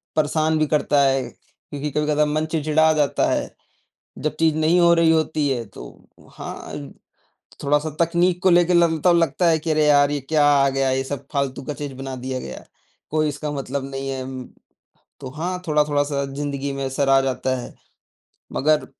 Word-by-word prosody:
परेशान 155 +1 +1
भी 155 - +2
करता 145 -1 +2
है, 135 -1 +2
क्योंकि 145 +1 -9
कभी-कदा 150 +1 +1
मन 155 +1 -1
चिढ़चिढ़ा 160 0 +2
जाता 150 -2 +1
है। - - -2 0.6
जब 155 - -2
चीज़ 160 -1 +3
नहीं 160 +3 +3
हो 170 -1 +6
रही 165 -1 +4
होती 155 -2 +1
है 120 -3 -2
तो - - -13 0.3
हाँ, 70 -1 -8 0.7
थोड़ा-सा 150 +2 +1
तकनीक 175 +2 +1
को 190 - +5
लेके 175 0 +4
ल 170 -1 +5 0.2
तब 175 -1 +6
लगता 170 +1 +1
है 160 - +3
कि 160 +1 -2
अरे 155 0 +2
यार! 145 -1 +4
ये 145 - -1
क्या 155 -2 +3
आ 140 -1 +4
गया, 135 0 0
ये 130 0 0
सब 140 +1 -6
फालतू 140 -1 -2
का 150 - -4
चीज़ 145 -1 -6
बना 135 0 -6
दिया 130 0 -3
गया, 65 - -8 0.5
कोई 155 0 +1
इसका 145 +1 -5
मतलब 140 -1 -4
नहीं 135 0 -4
है 135 -1 -4
उम, 130 0 -7 0.8
तो 130 - -7
हाँ, 180 +3 -3
थोड़ा-थोड़ा 150 -1 +2
सा 140 -1 -2
ज़िंदगी 140 0 -4
में 135 0 -3
असर 135 +1 -1
आ 135 0 +6
जाता 130 0 -1
है। - - -10 0.8
मगर 155 +2 +1
145 Hz, 185 wpm, -22 LUFS, 135-155 Hz, 0.8 s, हो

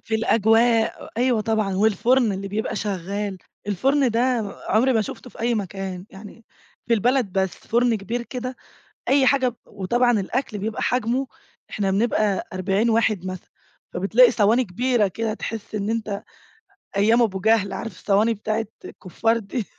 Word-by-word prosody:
في 220 - -4
الأجواء، 225 +1 +2
أيوه 245 -1 +2
طبعًا 215 -3 0
والفرن 220 +3 +3
اللي 195 +1 -5
بيبقى 210 +2 -3
شغّال، 200 0 -3 0.3
الفرن 265 +7 +2
ده 230 +1 0 0.5
عمري 245 +6 +3
ما 225 - +2
شُفته 250 +4 -8
في - - -13
أي 235 +1 +1
مكان، 195 -2 -5
يعني 210 +3 -12 0.4
في 230 - +3
البلد 240 -1 +1
بس 190 0 +1
فرن 240 0 +1
كبير 225 +4 -4
كده 250 +1 -6 0.5
أي 275 0 +4
حاجة 270 -2 +3
ب 240 - -14
وطبعًا 240 +4 +1
الأكل 220 +3 -3
بيبقى 215 +2 -4
حجمه 250 +2 0 0.4
إحنا 195 -2 -1
بنبقى 210 -1 +1
40 195 +4 +1
واحد 220 -4 +1
مثلًا، 185 -1 -7 0.4
فبتلاقي 220 +7 +5
صواني 230 +2 +3
كبيرة 235 +2 +1
كده 220 +3 -3
تحسّ 220 0 -6
إن 205 0 -2
أنت 215 -3 -3 0.7
أيام 225 +4 +4
أبو 200 -5 +1
جهل 215 0 +2
عارف 225 - -5
الصواني 205 +4 +1
بتاعة 220 +1 -2 0.2
الكفّار 225 +5 -1
دي، 225 +1 -4
220 Hz, 150 wpm, -23 LUFS, 200-235 Hz, 0.7 s, فبتلاقي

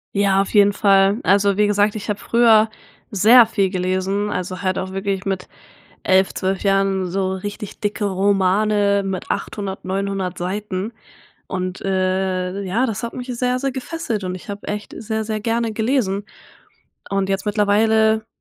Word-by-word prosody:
Ja, 195 -1 +3
auf 195 - -3
jeden 205 0 +6
Fall. 195 +2 +3
Also, 200 0 +3
wie 210 0 +3
gesagt, 205 0 +2
ich 215 0 -7
habe 205 - -1
früher 225 -2 +4 0.4
sehr 225 +5 +7
viel 200 -4 0
gelesen, 185 +2 -1
also, 185 +1 -4
halt 185 0 0
auch 185 0 -4
wirklich 195 0 -2
mit 190 -2 -3 0.6
11, 190 0 +3
12 190 0 -2
Jahren 195 -2 +1
so 190 0 -1
richtig 205 +2 -7
dicke 205 -1 -2
Romane 200 +1 +2
mit 190 -2 -5
800, 195 -2 -4
900 195 -1 -2
Seiten, 195 +3 -4 0.5
und, 185 0 -4
äh 185 0 -1
ja, 225 +8 0
das 220 -2 -4
hat 235 - -5
mich 250 0 -7
sehr, 250 0 +1
sehr 270 0 -2
gefesselt, 255 - -4
und 180 0 -3
ich 185 - -9
habe 200 0 -7
echt 210 0 -5
sehr, 220 -1 -3
sehr 215 -1 -3
gerne 230 0 -1
gelesen. 215 -3 0 0.9
Und 195 -1 0
jetzt 195 +2 -2
mittlerweile 220 +1 +2
200 Hz, 160 wpm, -20 LUFS, 190-215 Hz, 0.9 s, sehr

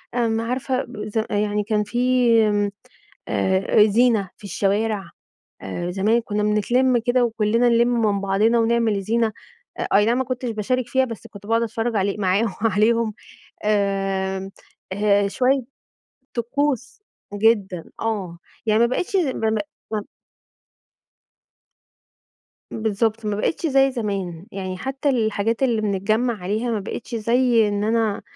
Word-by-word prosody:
امم 225 -2 +1
عارفة 255 +2 -2 0.2
ز 220 +1 -1
يعني 210 0 0
كان 210 0 0
في، 245 +2 +2 1.0
آآ، 190 +2 +3
زينة 220 -2 +2
في - - -22
الشوارع. 200 -1 -1 0.5
آآ، 175 - -4
زمان 215 +5 +2
كنّا 210 -1 -2
بنتلم 240 +5 +2
كده 245 +2 +2
وكلنا 230 +1 +2
نلِم 235 0 +4
من 205 -3 +1
بعضنا 205 +4 +2
ونعمل 230 -2 +2
الزينة. 220 +3 0 0.5
أ - - -1 0.2
أي 205 - +4
نعم 235 +3 +2
ما 260 - +1
كنتش 255 -1 -3
باشارك 235 +3 -1
فيها 265 +1 +2
بس 230 -2 -8
كنت 205 -2 -13
باقعد 230 +1 +2
أتفرّج 225 +1 -2
علي 200 +1 0
معاهم 200 +2 +1
عليهم 220 +1 +2 0.5
آمم، 195 -2 0 0.4
آآ، 205 0 +2
شويّة 260 +5 +1 0.7
طقوس 275 - -2 0.3
جدًا 200 -5 +1 0.2
آه. 200 -6 -2 0.3
يعني 215 0 +3
ما 235 - +5
بقيتش 360 +11 -1
ز 350 -5 +2
ما 225 -4 -1
بقي 220 +8 -2 0.2
ما 215 - 0
ب - - -14 2.7
بالضبط، 220 0 -1
ما 210 -1 -1
بقيتش 270 +10 -1
زي 270 -1 +4
زمان. 195 -7 -4
يعني 185 -1 -5
حتّى 270 +6 -2
الحاجات 225 -1 0
اللي 235 -4 +2
بنتجمع 215 +4 0
عليها 215 +6 -1
ما 220 - 0
بقيتش 220 +4 -6
زي 230 0 +3
إن 205 0 -1
أنا 220 -1 0
220 Hz, 140 wpm, -22 LUFS, 205-240 Hz, 2.7 s, ما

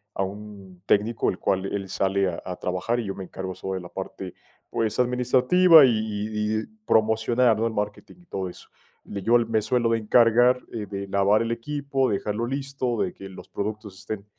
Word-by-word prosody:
a - - -1
un 100 -2 -9
técnico, 105 +3 +1
el 95 - -8
cual 95 0 0
él 100 -1 -4
sale 95 0 +1
a 85 - -6
a 90 - -4
trabajar 90 +7 -1
y 115 - -3
yo 95 - -4
me 95 - -6
encargo 95 0 -6
sobre 95 -1 -4
la 85 - -10
parte, 95 -1 -7 0.4
pues, 110 -2 -1
administrativa 130 +7 +5
y 130 - +4
y 105 0 -2
y - - -8 0.2
promocionar, 110 - +3
¿no?, 115 - +1
el 110 - -4
marketing 105 +7 -4
y - - -22
todo 95 - -4
eso. - - -13 0.4
Le 100 - -6
Yo 115 +5 +4
me 115 -2 0
suelo 120 +1 +1
de 115 - +2
encargar, 120 +3 +4
eh, 110 -3 -4
de 100 0 -5
lavar 100 +2 +3
el 115 0 -1
equipo, 140 +2 -1
dejarlo 105 +3 -2
listo, 135 -2 -2
de 90 - -1
que 95 - -10
los 95 - -12
productos 105 -1 -5
estén 100 -2 -6
110 Hz, 195 wpm, -25 LUFS, 100-120 Hz, 0.4 s, administrativa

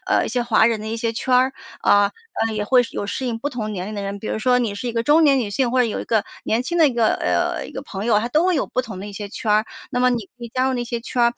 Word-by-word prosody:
呃， - - +2
一 - - -3
些 245 -1 0
华 225 -1 +4
人 225 -2 0
的 215 - -7
一 225 - -3
些 230 0 -1
圈 255 +2 0
儿。 260 +1 +4 0.3
啊， 205 0 +4 0.3
呃， 220 - -3
也 210 -1 -1
会 250 +2 +5
是 230 - -9
有 200 - -3
适 260 +5 -3
应 230 -2 -2
不 285 +5 -3
同 215 -5 -4
年 185 -1 -4
龄 215 - -6
的 200 - -4
人， 200 0 -4
比 215 - -8
如 - - -2
说 250 +2 +3
你 225 -5 -1
是 240 +4 -4
一 - - -3
个 230 0 0
中 305 +5 +5
年 275 -2 +5
女 210 - -3
性， 245 +3 0
或 255 - +1
者 - - +5
有 225 - -2
一 - - -5
个 220 -3 +1 0.2
年 230 +3 +1
轻 345 +6 -2
的 310 -3 +6
一 - - -3
个， 230 -2 +3
呃， - - -1
一 - - -12
个 - - -6
朋 200 +2 -6
友， 210 -3 +4
它 235 - -2
都 310 +7 +2
会 365 - +3
有 285 - 0
不 255 - -1
同 210 -6 -8
的 200 - -6
一 205 - -8
些 205 0 -6
圈 215 +1 -4
儿。 215 +1 +3 0.2
那 245 - -1
么 250 - +5
你 230 -5 -2
可 240 - -8
以 - - -6
加 255 +1 +2
入 - - 0
那 240 -1 -2
些 235 0 -4
圈 240 +1 -1
儿， 235 0 +4
235 Hz, 380 characters per minute, -21 LUFS, 215-250 Hz, 0.3 s, 的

